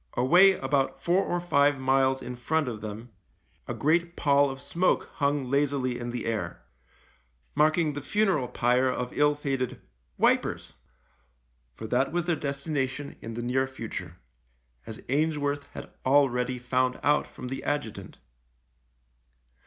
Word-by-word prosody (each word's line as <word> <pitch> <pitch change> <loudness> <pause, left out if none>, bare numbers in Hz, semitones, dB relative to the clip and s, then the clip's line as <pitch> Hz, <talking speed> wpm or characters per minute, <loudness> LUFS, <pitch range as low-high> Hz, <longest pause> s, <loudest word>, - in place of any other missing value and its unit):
Away 175 +10 +6
about 135 -4 -1
four 180 +3 +2
or 175 - -1
five 145 -5 +3
miles 130 0 +2
in 125 0 -6
front 150 +4 0
of 110 -3 -5
them 110 +3 -7 0.6
a - - -3
great 170 +3 +1
pall 140 -1 +3
of 135 0 -6
smoke 180 +6 0
hung 140 -1 +1
lazily 135 -2 0
in 120 0 -4
the 120 0 -4
air 115 -2 -3 0.4
— - - -36 0.2
marking 155 +1 +3
the 145 - -5
funeral 190 -6 +1
pyre 125 +1 +2
of 125 -1 -3
ill 145 0 +3
fated 135 -3 -3 0.2
" - - -43
Wipers." - - 0 1.0
For - - -8
that 125 +4 +1
was 175 0 -1
their 175 -2 +1
destination 140 -1 -3
in 115 0 -7
the 120 - -4
near 130 +2 +1
future, 105 -9 -7 0.7
as 110 - -8
Ainsworth 145 0 0
had - - -9
already 130 -2 +2
found 125 +1 0
out 145 +1 +2
from 125 - -8
the 135 +1 -5
adjutant. 145 -7 -4
135 Hz, 145 wpm, -27 LUFS, 125-145 Hz, 1.0 s, Away